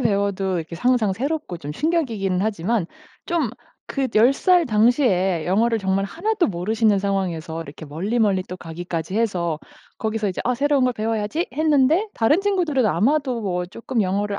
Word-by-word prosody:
배워도 200 -4 0
이렇게 165 0 -5
항상 235 0 +2
새롭고 275 - -3
좀 145 -1 -6
충격이기는 225 - 0
하지만 205 -1 0 0.4
좀 325 -9 0 0.4
그 270 -2 -1
10 235 +5 +6
살 355 +3 +3
당시에 210 - +2
영어를 225 +5 +2
정말 195 0 0
하나도 385 - 0
모르시는 205 +3 +1
상황에서 175 -5 -2
이렇게 155 +1 -10
멀리멀리 195 +5 0
또 180 - -6
가기까지 170 0 -5
해서 175 -8 0 0.4
거기서 220 -2 -1
이제 185 - -4
'아 250 +1 +1
새로운 285 0 +2
걸 250 - +2
배워야지.' 220 - -2
했는데 310 +6 +3
다른 290 - +3
친구들은 350 - +1
아마도 250 - +1
뭐 180 -2 -1
쪼끔 230 +4 -2
영어를 200 +2 -1
215 Hz, 365 characters per minute, -22 LUFS, 185-260 Hz, 0.4 s, 10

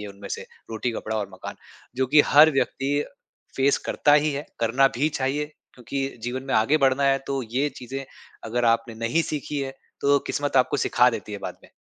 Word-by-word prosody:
ये 105 - -6
उनमें 100 0 -10
से - - -4 0.3
रोटी-कपड़ा 110 -1 -3
और 105 -2 -2
मकान 95 - -8 0.4
जो 130 0 +1
कि 150 - +10
हर 150 +2 +7
व्यक्ति 135 0 0 0.6
फ़ेस 135 +1 +3
करता 145 - +2
ही 150 0 +3
है, 140 +1 -5
करना 125 +4 +4
भी 150 +4 +3
चाहिए। 150 +2 -2 0.2
क्योंकि 135 +2 -3 0.2
जीवन 125 +2 -3
में - - -1
आगे 110 +8 +4
बढ़ना 135 0 +3
है 135 0 +3
तो 135 -1 -2
ये 140 +4 +1
चीज़ें 135 +2 -6 0.4
अगर 120 +2 -1
आपने 115 0 +1
नहीं 115 +9 0
सीखी 150 -2 -4
हैं, 135 -1 -4 0.3
तो 140 0 +4
किस्मत 145 -2 -1
आपको 130 - +3
सिखा 125 +1 +3
देती 110 -3 -6
है 100 - -4
बाद - - -6
में। - - -16
135 Hz, 200 wpm, -24 LUFS, 115-140 Hz, 0.6 s, कि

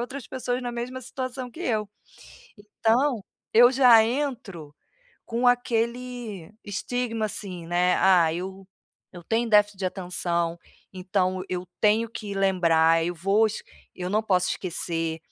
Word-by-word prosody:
outras 260 +2 -6
pessoas 250 -1 -3
na 245 -1 -4
mesma 245 +2 -5
situação 255 0 -5
que 320 - -12
eu. 215 - -1 0.9
Então 235 -1 +2 0.3
eu 240 +3 +7
já 245 -4 +7
entro 230 - -4 0.5
com 240 +2 -1
aquele 240 -5 -1
estigma, 225 +2 -3
assim, 185 -5 -6
né: 180 +1 +2
"Ah, 175 -4 +4
eu 190 +2 -6 0.5
eu 175 -1 -10
tenho 230 +3 0
déficit 210 -2 +4
de 190 - -1
atenção, 175 -2 -2 0.3
então 185 0 -1
eu 180 0 -4
tenho 220 +2 +3
que 205 -3 -6
lembrar, 165 -4 +3
eu 175 +1 -2
vou 195 +6 +2
es 215 - -5 0.3
eu 180 0 -5
não 215 +2 +1
posso 185 -4 +1
esquecer", 165 -2 -2
210 Hz, 135 wpm, -25 LUFS, 180-240 Hz, 0.9 s, eu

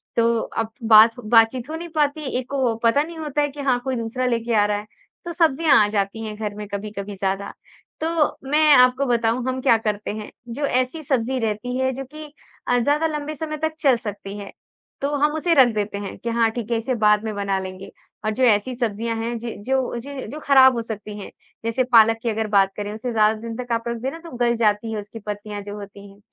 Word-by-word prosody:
तो 230 0 +3
अब 225 0 -4 0.2
बात 220 +1 +9 0.2
बातचीत 235 +3 +4
हो 315 - -4
नहीं 340 +1 -6
पाती। 295 0 +1 0.2
एक 255 - -6
को 260 -5 0
पता 230 +5 +4
नहीं 330 +1 -9
होता 295 -2 -2
है 290 - +2
कि 285 +1 -8
हाँ, 260 -3 +2
कोई 265 0 -2
दूसरा 235 +2 -2
लेके 235 -1 0
आ 205 -1 +4
रहा 205 0 0
है 210 +1 -8 0.4
तो 345 - -4
सब्जियाँ 325 -2 +3
आ - - +1
जाती 205 +1 -1
हैं 215 -1 -5
घर 210 -1 -4
में 210 0 -7
कभी-कभी 205 0 -6
ज़्यादा, 195 +1 -2 0.5
तो 315 - -1 0.4
मैं 305 +1 +5
आपको 255 +1 +5
बताऊँ 235 -1 +1
हम 260 0 -1
क्या 250 -3 +4
करते 210 -2 -3
हैं 215 -1 -7 0.3
जो 285 +2 -1
ऐसी 255 +4 0
सब्ज़ी 260 -2 0
रहती 225 +2 -2
है 260 0 +1
जो 270 +2 -5
कि 305 0 -8 0.4
अ, 245 - +3
ज़्यादा 290 +6 +2
लंबे 300 -1 -4
समय 305 +1 -4
तक 315 +1 -2
चल 270 -4 +4
सकती 205 -3 -7
है 200 -1 -8 0.5
तो 280 - 0
हम 295 +1 +2
उसे 335 +2 +1
रख 265 -5 +7
देते 205 -1 -2
हैं 200 -1 -6
कि 235 - -5
हाँ, 230 -1 +2
ठीक 235 0 -5
है 230 - +2
इसे 250 +3 -2
बाद 210 0 +4
में 220 -1 -3
बना 200 -1 -1
लेंगे 190 0 -8 0.3
और 215 - +1
जो 260 - 0
ऐसी 230 +1 +3
सब्जियाँ 230 -1 -2
हैं 230 +1 -3
जि 235 0 -6
जो 265 -2 0
ज 275 +2 -7
जो 300 - -6
खराब 265 -2 +7
हो 235 - -1
सकती 210 -2 -7
हैं, 200 - -8 0.4
जैसे 230 +3 +1
पालक 225 -2 +5
की 235 - 0
अगर 220 0 -1
बात 195 -1 +5
करें 205 0 -4
उसे 225 +3 -4
ज़्यादा 215 -1 +3
दिन 230 0 -6
तक 250 -1 -6
आप 230 0 -1
रख 235 0 -2
दे 260 - -1
ना 325 - -8
तो 335 - -10
गल 240 -1 +2
जाती 225 0 +1
है 220 - -3
उसकी 210 +2 -9
पत्तियाँ 205 0 -6
जो 205 0 -7
होती 200 0 -10
हैं, 200 +1 -18
230 Hz, 235 wpm, -22 LUFS, 210-265 Hz, 0.5 s, बात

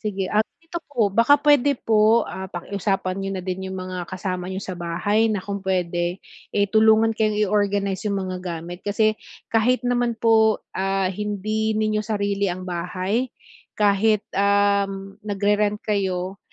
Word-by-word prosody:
Sige, 195 -3 -3
ah 215 +1 +3 0.2
ito 340 +1 -5
po, 235 -7 +2
baka 240 +6 +5
puwede 285 -2 +4
po, 220 +1 +3
ah, 190 0 -6
pakiusapan 195 +1 -2
nyo 195 - -3
na 185 - -6
din 190 0 -4
yung 190 - -5
mga 185 -1 -5
kasama 185 -1 -4
nyo 190 - -3
sa 185 - -5
bahay 180 +6 0
na 210 - 0
kung 200 0 -5
puwede, 175 -1 -1 0.3
eh, 205 0 +2
tulungan 220 +1 +4
kayong 215 -1 +1
i-organize 200 -1 0
yung 200 -1 0
mga 185 -1 -4
gamit. 175 0 -6
Kasi 215 +1 +2 0.4
kahit 230 +2 +2
naman 245 -1 +1
po, 220 -1 +4 0.2
ah, 195 0 0
hindi 210 +2 -2
ninyo 215 0 +1
sarili 200 -2 0
ang 185 +1 -6
bahay, 185 +7 -2 0.5
kahit, 210 +1 +3
uhm, 200 0 +1
nagre-rent 205 0 +1
kayo 190 -2 -1
200 Hz, 150 wpm, -23 LUFS, 190-215 Hz, 0.5 s, baka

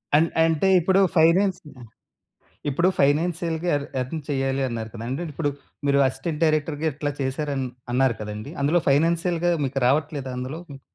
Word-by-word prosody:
అన్ 160 +3 +5 0.2
అంటే 165 +3 +2
ఇప్పుడు 190 +3 +3 0.2
ఫైనాన్స్ 180 +4 +4 0.2
ఆహ్, 120 - -11 0.8
ఇప్పుడు 170 +6 +2
ఫైనాన్షియల్‌గా 165 +3 +1
ఎర్న్ 140 - -4
ఎర్న్ 145 +6 -5
చెయ్యాలి 135 -1 0
అన్నారు 115 -2 -4
కదండీ! 115 +1 -5
అంటే 170 - -5
ఇప్పుడు 145 0 0 0.4
మీరు 140 0 +4
అసిస్టెంట్ 150 +4 -4
డైరెక్టర్‌గా 155 0 0
ఇట్లా 145 +1 -2
చేసారని 135 0 -2 0.2
అన్నారు 130 -2 +2
కదండీ! 105 +6 -6
అందులో 155 +5 +3
ఫైనాన్షియల్‌గా 170 +4 +2
మీకు 135 0 -2
రావట్లేదా 140 -1 0
అందులో? 130 +6 -5
హ్మ్. 135 -1 -10
145 Hz, 150 wpm, -24 LUFS, 135-165 Hz, 0.8 s, అన్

